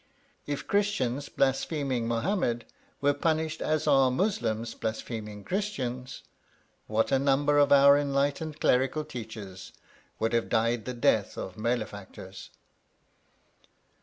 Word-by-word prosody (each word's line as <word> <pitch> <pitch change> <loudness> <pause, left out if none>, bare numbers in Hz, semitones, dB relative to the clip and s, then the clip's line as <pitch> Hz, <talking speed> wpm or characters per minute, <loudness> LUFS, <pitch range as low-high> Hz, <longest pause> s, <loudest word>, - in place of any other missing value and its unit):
If 145 -1 -3
Christians 145 -10 0
blaspheming 135 -2 0
Mohammed 120 - 0 0.4
were 145 0 +3
punished 160 +2 -1
as 155 -1 0
are 135 -1 +5
Muslims 120 - -1
blaspheming 110 -2 -5
Christians, 130 - -3 0.6
what 110 +1 +1
a 135 - +4
number 145 +2 +3
of 145 - +4
our 140 0 +7
enlightened 145 +2 -1
clerical 130 +4 +2
teachers 105 -7 -8 0.4
would 110 +1 -1
have 115 -1 +1
died 115 0 +1
the 125 - -4
death 110 -3 +1
of 95 - -6
malefactors! 110 -3 -4
130 Hz, 110 wpm, -28 LUFS, 115-145 Hz, 0.6 s, our